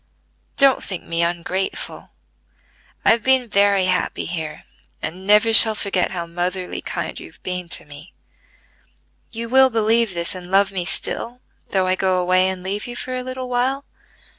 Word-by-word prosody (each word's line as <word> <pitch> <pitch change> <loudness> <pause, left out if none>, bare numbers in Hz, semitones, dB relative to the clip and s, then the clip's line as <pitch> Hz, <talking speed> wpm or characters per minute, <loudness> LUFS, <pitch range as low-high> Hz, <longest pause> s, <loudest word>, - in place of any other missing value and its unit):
"Don't 275 -2 +4
think 185 -4 -5
me 165 0 -2
ungrateful. 175 +3 -3 1.0
I - - +6
have 230 - +2
been 260 0 +3
very 200 -2 +3
happy 185 0 -1
here, 160 -3 -5 0.4
and 185 +4 -6
never 210 +2 +5
shall 220 0 +9
forget 195 -3 -1
how 175 -2 -4
motherly 180 +2 -4
kind - - -5
you - - -10
have - - -23
been 180 -1 -4
to - - +1
me. 145 +5 -13 1.2
You 230 0 -6
will 265 +2 +5
believe 225 -3 +1
this 170 0 -2
and 180 -1 -9
love 195 +1 +3
me 185 -3 -3
still, 235 +5 -2 0.3
though 190 -1 +1
I 185 - +2
go 185 0 +1
away 185 +1 +2
and 185 -1 -5
leave 200 +4 -4
you 245 - -7
for 255 +1 -5
a 255 - -3
little 255 0 -6
while?" 255 +3 -1
190 Hz, 170 wpm, -20 LUFS, 180-230 Hz, 1.2 s, shall